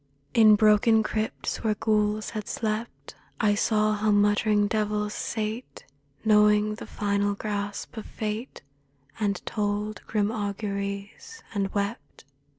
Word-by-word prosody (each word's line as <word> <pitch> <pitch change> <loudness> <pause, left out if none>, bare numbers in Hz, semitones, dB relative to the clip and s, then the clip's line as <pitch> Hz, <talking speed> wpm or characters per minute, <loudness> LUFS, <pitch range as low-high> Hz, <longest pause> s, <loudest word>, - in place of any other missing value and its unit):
In 215 -2 +7
broken 215 +1 +4
crypts 215 0 -3
where 215 -2 +1
ghouls 210 0 0
had 215 -3 -5
slept 220 +1 -4 0.3
I 210 -2 +3
saw 215 0 +2
how 215 +1 0
muttering 205 0 +3
devils 210 -1 -1
sate 220 +2 -4 0.4
(Knowing 210 0 +4
the 215 - -8
final 200 -1 0
grasp 205 0 -4
of 220 - -6
Fate) 215 - -5 0.6
And 200 -3 -1
told 210 -1 -2
grim 210 -1 0
auguries, 200 - -4
and 195 -2 -1
wept. 200 - -4
210 Hz, 120 wpm, -26 LUFS, 205-215 Hz, 0.6 s, In